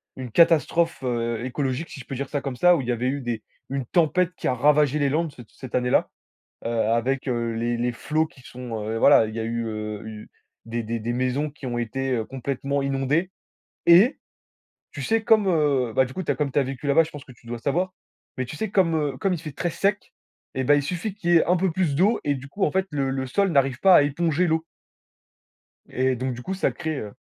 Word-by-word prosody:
une 125 -3 -7
catastrophe, 165 0 +3
heu, 120 -1 -1
écologique- 130 +3 -2
si - - -9
je - - -10
peux 135 - -6
dire 140 +1 -4
ça 145 - -1
comme 135 -3 -4
ça- 180 +5 +5
où - - -1
il 120 - -7
y - - +1
avait 125 +2 -1
eu 140 +1 -2
des 120 -3 -4 0.3
une 135 -2 -3
tempête 175 +4 +2
qui - - -3
a 130 - +2
ravagé 150 +2 +3
les 140 -1 +2
Landes 155 +1 -1
c 120 - -11
cette 130 -3 -8
année-là, 125 0 +2 0.6
heu, - - 0 0.2
avec, 130 +4 0
heu, 120 -2 -1
les 120 +1 -1
les 120 0 0
flots 155 +6 0
qui 130 - -19
sont, 120 -4 -6
heu, 110 +1 -2
voilà, 115 -5 +6
il 110 - -7
y 115 - -3
a - - -2
eu, 115 0 -2
heu, 110 0 -5
eu 110 -1 -9 0.4
des 115 +1 -3
des 115 +1 -3
des 120 +2 -2
maisons 130 +4 -1
qui 145 0 -14
ont 120 -1 -2
été 125 +1 -1
complètement 140 +1 -2
heu - - -3
inondées 140 +7 0 0.6
et 190 - +6 0.7
tu - - -7
sais 225 0 +1
comme, 220 -3 +4
heu, 145 -8 +2
ben 130 - +4
du 130 - -9
coup, 185 - -4
tu 145 - 0
as - - -1
comme 140 -1 -1
tu 145 - +2
as - - +3
vécu 135 +2 -6
là-bas, 140 +4 +5
je 160 - -8
pense 145 -2 -10
que 130 - -13
tu 120 -1 -19
dois 120 0 -4
le - - -15
savoir. 180 +8 0 0.4
Mais 130 - -1
tu 125 - -8
sais 220 +5 -3
comme, 180 -5 +2
heu, 145 -4 -1
comme 195 +4 0
il 175 - -3
fait 155 - -6
très 175 +5 -2
sec, 200 +3 -1 0.4
et 130 - 0
bah, 145 - +5
il 145 - +1
suffit 180 +7 -3
qu'il 175 -4 -1
y - - +6
ait - - +3
un 180 - +3
peu 185 -1 +1
plus 160 -5 0
d'eau 200 +8 +3
et 145 -1 +1
du 135 +1 -8
coup 200 +6 0
en - - 0
fait 190 0 +1
le 135 -2 -1
le 130 0 -2
sol 195 +7 +1
n'arrive 135 -4 +2
pas 190 -2 +6
à - - +6
éponger 165 +4 +1
l'eau! 160 0 0 1.2
Et 130 0 +1
donc, 130 0 -2
du 125 - -8
coup 190 +8 -3
ça 190 - +1
crée, 160 -4 -4
heu 105 -1 -7
140 Hz, 255 wpm, -24 LUFS, 125-165 Hz, 1.2 s, voilà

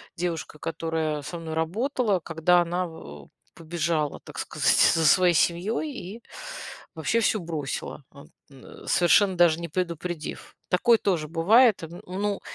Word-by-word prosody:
девушкой, 165 -3 -4
которая 160 -2 -2
со 170 +5 -6
мной 160 -1 -6
работала, 210 - 0
когда 170 +2 +2
она 175 +1 -2
в 75 - -12 0.3
побежала, 160 -2 -2
так - - -12
сказать, - - +1 0.2
за 165 -1 +2
своей 180 +4 +5
семьей 190 - 0 0.3
и - - -22 0.7
вообще 160 +9 0
всё 215 - +2
бросила, 150 -4 -5
от, 140 0 -15 0.2
н 135 - -14
совершенно 185 +2 +4
даже 170 -2 +4
не 170 - -5
предупредив. 170 -1 -5
Такое 230 +6 +4
тоже 165 -6 -1
бывает. 205 - +4 0.3
Ну, 200 +2 -2
170 Hz, 135 wpm, -25 LUFS, 160-185 Hz, 0.7 s, своей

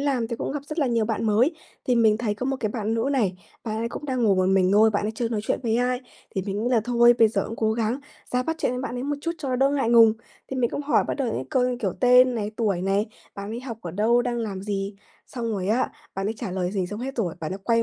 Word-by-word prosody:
làm 265 -5 0
thì 235 - -3
cũng - - -3
gặp 290 -1 -5
rất 305 +3 -6
là 285 - +3
nhiều 230 -2 +1
bạn 225 +1 -2
mới. 235 +10 +3 0.3
Thì 250 - +3
mình 220 -2 +4
thấy 215 -3 -1
có 250 +5 -4
một 270 0 0
cái 215 - 0
bạn 220 0 -2
nữ 230 +4 0
này, 200 -9 +1 0.3
bạn 215 -2 -3
ấy 230 +1 -1
cũng 290 - -7
đang 255 -3 -1
ngồi 195 -3 +4
một 185 - +2
mình 190 0 +3
thôi, 220 +2 +6
bạn 205 0 0
ấy 220 - -2
chưa 230 +1 -1
nói 225 -2 -1
chuyện - - -1
với 230 -1 +1
ai, 250 +1 +1 0.3
thì 190 - -1
mình 205 +2 -2
nghĩ 245 - 0
là 235 -3 +4
"Thôi 240 0 +5
bây 225 - +6
giờ 215 - -1
cũng 225 - -6
cố 220 -1 +1
gắng 230 +4 -1 0.3
ra 250 0 +2
bắt 320 +4 -2
chuyện 250 - 0
với 250 - -3
bạn 250 - -4
ấy 245 - -3
một 285 +1 -2
chút 335 +3 -2
cho 285 -4 -4
nó 255 - 0
đỡ 270 +2 +3
ngại 270 -5 +1
ngùng." 230 -2 +7 0.4
Thì 265 - -4
mình 240 -2 +1
cũng 290 - -3
hỏi 290 - +2
bắt - - 0
đầu 270 -4 -1
những 130 - -3
câu 255 - +2
như, 250 - -2
kiểu, 195 -5 0
tên 250 0 +6
này, 210 -2 -2
tuổi 200 -6 0
này, 195 +3 +1 0.3
bạn 200 +1 -6
ấy 235 +2 -4
học 235 -4 -7
ở 170 - -5
đâu, 225 +7 +2
đang 240 -1 -2
làm 200 -4 -4
gì, 200 -1 -3 0.3
xong 230 -3 -4
rồi 190 -2 -2
á 235 +4 +1 0.2
bạn 195 +1 -2
ấy 220 - -1
trả 230 -6 -4
lời 180 -1 -1
gì 190 -3 -1
xong 210 +4 -6
hết 270 +1 -5
rồi 185 -8 -1
bạn 155 +1 -3
ấy 190 - -5
quay 230 -1 +3
230 Hz, 310 wpm, -25 LUFS, 210-250 Hz, 0.4 s, ngùng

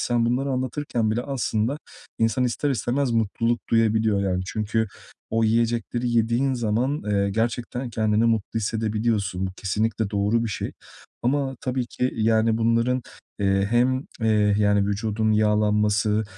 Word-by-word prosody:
sen 120 -1 +1
bunları 130 +4 0
anlatırken 130 -3 -1
bile 120 +3 0
aslında 125 0 -1 0.4
insan 115 +3 +2
ister 135 +4 -1
istemez 130 +1 0
mutluluk 115 +1 0
duyabiliyor, 110 -2 +2
yani, 90 -1 0
çünkü 110 +2 -1 0.4
o 115 +1 +2
yiyecekleri 115 +1 0
yediğin 120 +4 +1
zaman, 120 +6 0
eee, 100 -1 +1
gerçekten 120 +3 -2
kendini 110 0 +1
mutlu 115 -1 0
hissedebiliyorsun. 105 -3 -1
Bu 95 - -6
kesinlikle 105 +2 -1
doğru 105 +3 +1
bir 115 - -2
şey 105 - -4 0.5
ama 135 +1 0
tabii 125 -1 -2
ki, 125 +1 -2
yani, 110 0 +2
bunların, 115 +2 +1 0.4
eee, 100 -1 +2
hem, 130 +3 +2 0.2
eee, 105 -2 +3
yani, 100 -1 +3
vücudun 110 +1 0
yağlanması 105 0 +2
115 Hz, 135 wpm, -24 LUFS, 105-120 Hz, 0.5 s, eee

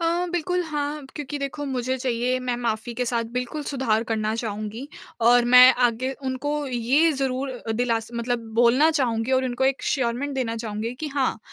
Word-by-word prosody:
अ, 340 +2 +1
बिल्कुल 360 +1 0
हाँ, 295 -2 -3
क्योंकि 295 -1 -5
देखो 280 +1 -4
मुझे 260 -1 -1
चाहिए 250 0 0
मैं 250 -1 -2
माफ़ी 235 -1 -3
के 250 +2 -1
साथ 235 -1 -1
बिल्कुल 250 +5 -3
सुधार 255 -6 0
करना 220 -1 -1
चाहूँगी। 215 +3 -5 0.3
और 240 +1 +5
मैं 255 +1 +10 0.2
आगे 255 +3 -3
उनको 290 +3 -2
ये 265 +6 +2
ज़रूर 265 -1 -3
दिलास 230 -1 0
मतलब 235 0 -2
बोलना 245 +7 +5
चाहूँगी 250 -5 0
और 260 0 +3
उनको 255 +1 -1
एक 265 0 +2
एश्योरमेंट 265 +2 -1
देना 230 -3 -2
चाहूँगी 225 +1 -4
कि 310 - -3
हाँ 270 -5 0
255 Hz, 170 wpm, -24 LUFS, 235-280 Hz, 0.3 s, मैं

